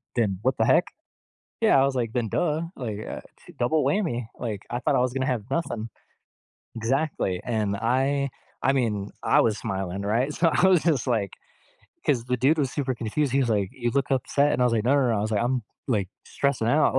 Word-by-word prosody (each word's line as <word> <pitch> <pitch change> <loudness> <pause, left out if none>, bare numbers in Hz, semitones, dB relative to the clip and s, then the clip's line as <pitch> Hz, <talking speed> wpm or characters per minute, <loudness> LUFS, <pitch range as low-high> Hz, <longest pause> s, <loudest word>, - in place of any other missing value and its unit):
then, 100 -6 +1
"What 130 0 +1
the 110 - +2
heck?" - - +4 0.8
Yeah. - - +5
I - - +5
was 135 -1 -1
like, 115 -2 -2
"Then 120 -3 -1
duh. 155 +3 0 0.2
Like, 110 -6 -4
uh, - - -5 0.4
double 150 +6 +2
whammy," 125 - 0
like, 110 -4 -4
I 120 - -2
thought - - +1
I - - +3
was 125 0 +1
gonna 130 0 -1
have 120 -6 -1
nothing. 120 -8 -2 0.9
Exactly. 115 - -1
And 110 -4 -1
I 135 +5 +1 0.3
I 135 - +3
mean, 105 -6 0
I - - +4
was 110 -2 +1
smiling, 95 0 -3
right? 120 +8 +1
So, 170 -1 +3
I 190 - +4
was 180 -4 +4
just 150 -8 +1
like 110 -6 0 0.8
'cause 120 -5 +2
the 125 0 0
dude 140 +6 +3
was 135 -3 +1
super 135 -3 -1
confused. 120 +4 -1
He 135 - +2
was 125 - +1
like, 100 -3 +1
"You 120 -3 -2
look 135 -2 0
upset," 140 +2 +2
and - - 0
I - - +5
was 120 - +1
like, 110 0 0
"No, 130 - +3
no, 135 -3 +3
no." 115 - +1
I - - 0
was 110 +1 -2
like, 105 - +1
"I'm, 125 0 0 0.3
like, 105 -7 0 0.2
stressing 135 -5 0
out," 150 +1 +3
like - - +6
125 Hz, 225 wpm, -25 LUFS, 110-140 Hz, 0.9 s, like